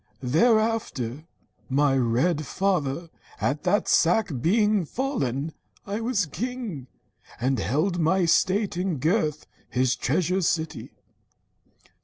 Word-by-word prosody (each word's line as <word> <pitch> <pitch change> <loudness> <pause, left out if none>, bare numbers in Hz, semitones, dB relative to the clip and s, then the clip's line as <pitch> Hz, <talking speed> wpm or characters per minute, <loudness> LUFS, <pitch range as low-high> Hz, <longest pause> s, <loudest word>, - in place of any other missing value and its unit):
Thereafter, 165 - +1 0.4
my 140 0 +3
red 135 +6 +1
father 170 -4 -1 0.3
at 145 +2 0
that 200 +3 +2
sack 185 +3 +3
Being 210 - +3
fallen, 160 - -2 0.3
I 205 +3 -3
was 225 -5 0
king, 205 - -5 0.5
and 130 0 0
held 160 - 0
my 175 +3 +2
state 190 +3 +2
In 180 -3 -1
Gurth 155 - 0 0.2
his 130 +1 +1
treasure 180 +8 0
city. 160 -2 -1
170 Hz, 105 wpm, -25 LUFS, 140-205 Hz, 0.5 s, my